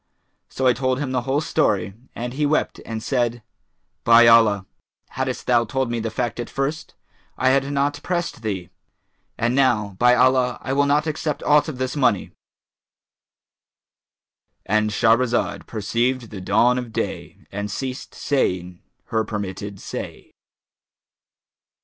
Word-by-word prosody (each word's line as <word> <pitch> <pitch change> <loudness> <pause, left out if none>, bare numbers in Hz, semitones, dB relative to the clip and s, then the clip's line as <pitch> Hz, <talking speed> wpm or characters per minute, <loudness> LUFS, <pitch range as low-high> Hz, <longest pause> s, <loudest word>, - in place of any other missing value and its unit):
So 130 - -3
I 125 - +6
told 130 +1 0
him 140 -2 -3
the 125 -1 0
whole 135 +4 0
story, 100 -9 0 0.2
and 120 +1 -4
he 150 +3 -2
wept 150 +1 0
and 110 -1 -5
said, 120 -3 -1 0.6
'By 115 0 +7
Allah, 110 -4 +5 0.4
haddest 130 -1 -3
thou 120 -1 +3
told 130 +2 -2
me 120 - -1
the 115 0 -2
fact 120 +1 -3
at 120 - -4
first, 140 +3 -3 0.4
I 130 - +3
had 135 +1 +2
not 145 +1 0
pressed 175 -8 -3
thee!; 95 -6 -4 0.7
and 120 +1 +1
now, 115 -7 +2
by 125 0 +5
Allah, 125 0 +3
I 130 - -2
will 140 +1 +2
not 145 +2 +2
accept 155 -1 -3
aught 150 +1 +4
of 155 -5 -5
this 130 +1 -2
money'"—And 110 -2 -6
Shahrazad 115 +3 +1
perceived 115 +3 -1
the 100 -3 -7
dawn 115 +7 +3
of 120 -2 -7
day - - -5
and 100 +1 -4
ceased 130 +5 -5
saying 90 -10 -1 0.3
her 110 0 +2
permitted 100 -2 -5
say. - - -7
120 Hz, 140 wpm, -22 LUFS, 110-135 Hz, 0.7 s, By